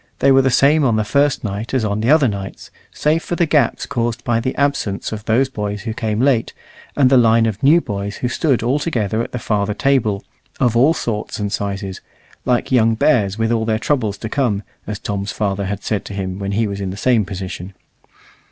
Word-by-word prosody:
They 140 - +4
were 135 0 +6
the 135 - +2
same 145 +4 +4
on 120 -5 +2
the 110 - +1
first 140 +6 +1
night 105 +4 -4
as 120 -4 +1
on 105 0 -1
the 115 - 0
other 150 -2 +5
nights, 100 -2 -6 0.2
save 155 +2 +1
for 175 - -3
the 170 - +2
gaps 150 -6 +1
caused 120 0 -2
by 115 -1 +1
the 130 +3 -2
absence 140 -8 -1
of 110 -1 -6
those 120 +4 +2
boys 105 -5 -4
who 115 -1 -3
came 110 -1 -2
late, 125 -3 +2 0.4
and 140 -3 +5
the 130 0 +5
line 115 -1 +4
of 110 -3 -2
new 155 +5 +5
boys 100 -4 -4
who 125 - -2
stood 130 -1 0
all 130 +5 +1
together 115 - -1
at - - -5
the - - -3
farther 105 -3 -1
table 115 -8 +1 0.4
of 120 -3 +2
all 140 +8 +4
sorts 110 -7 -3
and 100 -1 -3
sizes, 100 -1 -4 0.4
like 125 +1 0
young 115 -3 +4
bears 110 -6 +2
with 115 0 0
all 115 -1 +1
their 110 -1 0
troubles 110 -5 -1
to 110 - -5
come, 110 -5 0 0.2
as 105 0 -3
Tom's 100 -1 -4
father 100 +1 -2
had 100 +1 -4
said 105 -3 -1
to 100 - -7
him 95 -1 -4
when 100 0 -3
he 110 +3 +1
was 100 -1 -4
in 95 - -3
the 95 - -6
same 115 +1 +2
position. 95 -1 -7
110 Hz, 225 wpm, -19 LUFS, 100-130 Hz, 0.4 s, were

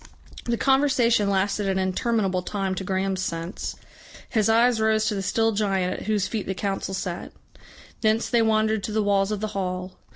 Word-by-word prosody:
The 235 -1 0
conversation 260 -6 +3
lasted 195 +1 0
an 190 - 0
interminable 190 0 0
time 195 0 -2
to 190 - -4
Graham's 190 0 -1
sense. 170 0 -4 0.5
His 220 -3 +1
eyes 230 0 +4
rose 220 0 +2
to 215 - +1
the 195 - -2
still 225 +4 +1
giant 195 -3 0
at - - -7
whose 210 -2 +1
feet 220 -3 -4
the 190 - -2
Council 195 -1 -2
sat. 180 -2 -4 0.7
Thence 220 +1 +2
they 235 -2 +3
wandered 220 -1 +2
to - - -4
the 215 0 +1
walls 200 0 +2
of 210 -1 -2
the 215 - -2
hall. 185 -1 -3
205 Hz, 185 wpm, -25 LUFS, 190-220 Hz, 0.7 s, eyes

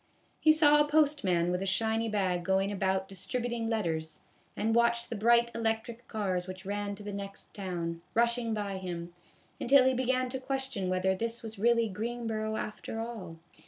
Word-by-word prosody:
He 315 - +6
saw 295 -1 +6
a 295 - +2
postman 280 - +2
with 180 +1 -1
a 195 - -2
shiny 225 +3 +1
bag 185 -4 0
going 190 +2 +1
about 190 -1 0
distributing 235 +4 -3
letters, 165 -8 -2 0.4
and 225 +1 +1
watched 235 0 +2
the - - -1
bright 235 +2 +4
electric 225 +1 -2
cars 190 -4 -2
which 185 +1 -8
ran 205 0 -2
to 205 - -10
the 205 0 -5
next 200 0 -7
town, 170 -4 -4
rushing 235 0 +2
by 205 -3 -2
him, 175 -2 -5 0.5
until 265 +1 +6
he 260 - +4
began 255 0 +1
to 265 +1 -3
question 265 -7 -2
whether 185 +1 +2
this 230 +4 -3
was 220 -2 -7
really 230 +1 +3
Greenboro 220 +1 -3
after 215 +1 -5
all. 220 -8 -6
220 Hz, 170 wpm, -30 LUFS, 190-235 Hz, 0.5 s, He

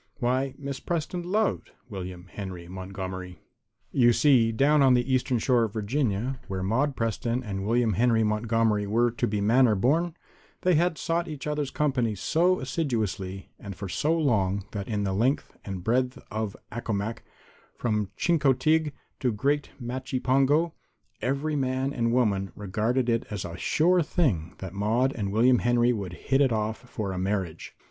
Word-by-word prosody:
Why, 130 +2 0
Miss 140 -2 -5
Preston 175 +1 -2
loved 205 +5 -1
William 90 -4 -7
Henry 95 -3 -7
Montgomery. 95 -1 -6 0.5
You 120 -2 +5
see, 120 -5 +4
down 140 +6 +3
on 130 -2 +6
the 125 +2 +1
Eastern 130 0 +1
Shore 120 0 +3
of 105 - -7
Virginia, 120 +2 -1
where 95 -2 -3
Maude 130 +8 +1
Preston 115 +2 -1
and 100 -3 -4
William 115 -1 +2
Henry 115 +2 +3
Montgomery 105 -1 +1
were 120 +3 +2
to 120 - -1
the 105 0 -1
manor 115 +2 +4
born, 155 - +1 0.5
they 180 - +3
had 170 +1 +2
sought 170 +1 -1
each 150 -4 -6
other's 150 -2 -1
company 130 -7 0
so 175 - +2
assiduously 110 - -3
and 100 -2 -7
for 100 - -6
so 155 - 0
long 100 - +1
that 100 -2 -5
in 105 -3 -1
the 95 -1 -1
length 125 +8 0
and 95 -3 -6
breadth 125 +4 +1
of 105 -1 -3
Accomac 115 -1 -3 0.5
from 105 -4 -1
Chincoteague 155 -1 +2 0.3
to 125 - +1
Great 140 +6 0
Machipongo 130 +5 +1 0.5
every 140 +4 -1
man 130 0 0
and 115 -2 0
woman 100 -6 +1
regarded 110 +6 -1
it 115 -1 0
as 105 -4 -4
a 85 -1 -6
sure 175 - +3
thing 130 - 0
that 95 -2 -7
Maude 115 +7 +1
and 100 -4 -3
William 120 +3 +4
Henry 120 0 +3
would 100 -6 -5
hit 135 +10 0
it 135 -3 +4
off 110 0 -1
for 100 -3 -3
a 90 - -3
marriage. 95 -4 -3
120 Hz, 160 wpm, -27 LUFS, 100-135 Hz, 0.5 s, on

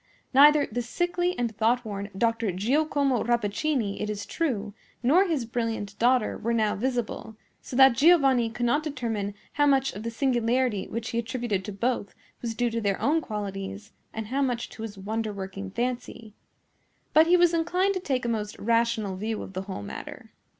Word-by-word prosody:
Neither 290 +2 +7
the 245 - -3
sickly 350 +8 -1
and 235 -3 -2
thoughtworn 220 -2 0
Dr. 230 -1 +1
Giacomo 270 - +1
Rappaccini, 235 0 0
it 210 - -2
is 205 -1 -4
true, 220 -11 -2 0.3
nor 330 +11 +5
his 300 -8 -1
brilliant 225 -3 -3
daughter, 245 -1 +2
were 235 +1 0
now 215 -2 +2
visible; 235 -1 -3 0.3
so - - -8
that 265 -1 +7
Giovanni 270 -4 +4
could 240 +1 -3
not 285 +6 +2
determine 230 -9 -3 0.2
how 290 0 +3
much 270 -1 +3
of 205 - -7
the 230 - -3
singularity 240 -3 +1
which 230 0 -4
he 235 - -1
attributed 235 -5 -2
to 210 - -5
both 230 +1 -2 0.3
was 230 -2 -3
due 240 0 0
to 230 0 -2
their 200 -2 0
own 320 +3 +2
qualities 200 -2 -5 0.2
and 220 -1 -6
how 275 +3 0
much 245 -3 -1
to - - -11
his 220 -2 -6
wonder 215 +3 -3
working 195 0 -6
fancy; 235 -1 -4 0.8
but 315 +1 +6
he 355 +1 +6
was 350 -1 +4
inclined 360 +4 +1
to 375 - -2
take 265 -8 -2
a - - 0
most 210 -3 -2
rational 230 -3 +1
view 215 +2 -3
of 190 - -10
the 185 - -3
whole 100 - -5
matter. 100 - -8
235 Hz, 180 wpm, -27 LUFS, 210-270 Hz, 0.8 s, Neither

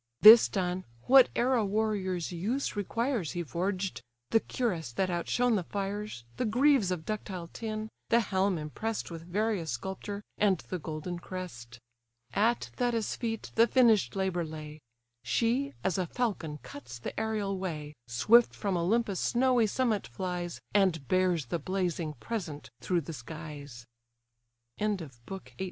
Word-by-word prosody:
This 220 +2 +11
done, 185 -1 -1 0.2
whate'er 260 -1 +6
a 235 -4 +3
warrior's 200 -4 -1
use 215 +12 -2
requires 225 - -1
He 175 -1 -2
forged; 185 +4 -2 0.3
the 225 - +6
cuirass 180 - -2
that 185 +5 0
outshone 230 +7 +1
the 190 - 0
fires, 200 - -4
The - - 0
greaves 250 -1 +4
of 175 -3 -3
ductile 190 -5 -4
tin, 215 -1 -4 0.2
the 235 - +5
helm 195 -3 +1
impress'd 180 +8 -4
With 165 -1 -6
various 185 0 -1
sculpture, 200 +2 -5 0.2
and 200 -3 +4
the 185 - -2
golden 160 +3 -5
crest. 140 -11 -7 0.6
At 230 +4 +1
Thetis' 240 -4 0
feet 225 -2 -4
the 230 +1 +5
finished 230 -5 +4
labour 190 -3 0
lay: 155 -1 -8 0.4
She, 250 +5 +1
as 190 0 +1
a 180 - 0
falcon 185 -10 -2
cuts 125 -3 -9
the 115 - -5
aerial 210 -3 -1
way, 155 -5 -4
Swift 215 - +5
from 200 -3 -1
Olympus' 195 +3 +1
snowy 245 -2 +3
summit 220 - 0
flies, 175 +7 -4
And 185 -9 +2
bears 185 -5 +2
the 165 +8 -2
blazing 175 -4 -1
present 170 -6 -5
through 175 -2 +1
the 165 +2 -7
skies. 145 -3 -8 0.9
BOOK 195 -9 -1 0.4
XIX. - - -21
190 Hz, 140 wpm, -30 LUFS, 170-220 Hz, 0.9 s, This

